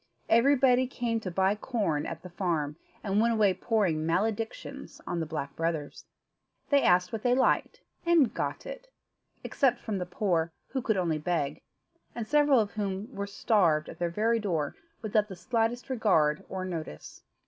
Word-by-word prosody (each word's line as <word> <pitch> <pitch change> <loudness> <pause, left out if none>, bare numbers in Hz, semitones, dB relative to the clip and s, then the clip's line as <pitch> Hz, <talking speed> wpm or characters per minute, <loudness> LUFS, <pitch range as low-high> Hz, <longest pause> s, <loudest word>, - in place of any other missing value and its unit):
Everybody 255 +1 +4
came 235 -3 -2
to 200 - -5
buy 190 +2 +2
corn 205 - -1
at 165 -1 -7
the 180 - -8
farm, 165 -5 -1 0.3
and 205 0 +1
went 230 +1 +3
away 205 -3 +4
pouring 190 -9 0
maledictions 220 - -2
on 175 - -2
the 160 - -2
Black 140 -3 -5
Brothers. 165 -3 -3 0.7
They 285 -1 +5
asked 180 +1 +3
what 220 - -3
they 245 +1 +3
liked, 260 - +1 0.2
and 335 -8 +4
got - - -3
it, - - -8 0.6
except 255 -4 +1
from 210 -4 -3
the 180 - -4
poor, 175 -3 0 0.2
who 265 - -2
could 220 -4 0
only 165 -4 0
beg, 150 -3 -2 0.5
and 230 -2 -4
several 290 -2 +4
of 210 -2 0
whom 205 +3 -4
were 200 0 -4
starved 180 -7 +2
at - - -10
their 175 -1 0
very 225 +6 +1
door, 165 -9 -2 0.3
without 210 -1 +1
the 190 - -8
slightest 230 +5 -1
regard 180 - +2
or 185 -1 -4
notice. 160 - -7
200 Hz, 170 wpm, -29 LUFS, 170-235 Hz, 0.7 s, They